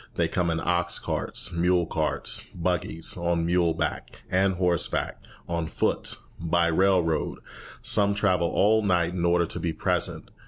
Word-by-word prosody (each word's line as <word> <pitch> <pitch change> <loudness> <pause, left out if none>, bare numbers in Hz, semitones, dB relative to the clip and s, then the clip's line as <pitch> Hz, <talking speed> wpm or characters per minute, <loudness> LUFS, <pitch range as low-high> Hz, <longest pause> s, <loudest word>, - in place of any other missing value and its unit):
They - - +1
come 90 -1 0
in 85 -1 0
ox 85 +1 +1
carts, - - -3
mule 90 +1 +2
carts, 75 -3 -1
buggies, 85 -2 -1
on 85 -1 0
muleback 85 -1 -1
and 95 +1 +2
horseback, 90 -2 -1 0.3
on 85 -1 -2
foot, - - -1 0.2
by 85 0 +1
railroad. 90 -2 +1 0.5
Some 100 0 +3
travel 90 -5 +2
all 110 +2 +3
night 90 -4 +1
in 90 -2 -2
order 85 0 +3
to - - -5
be 85 -2 -2
present. - - 0
85 Hz, 145 wpm, -26 LUFS, 85-90 Hz, 0.5 s, Some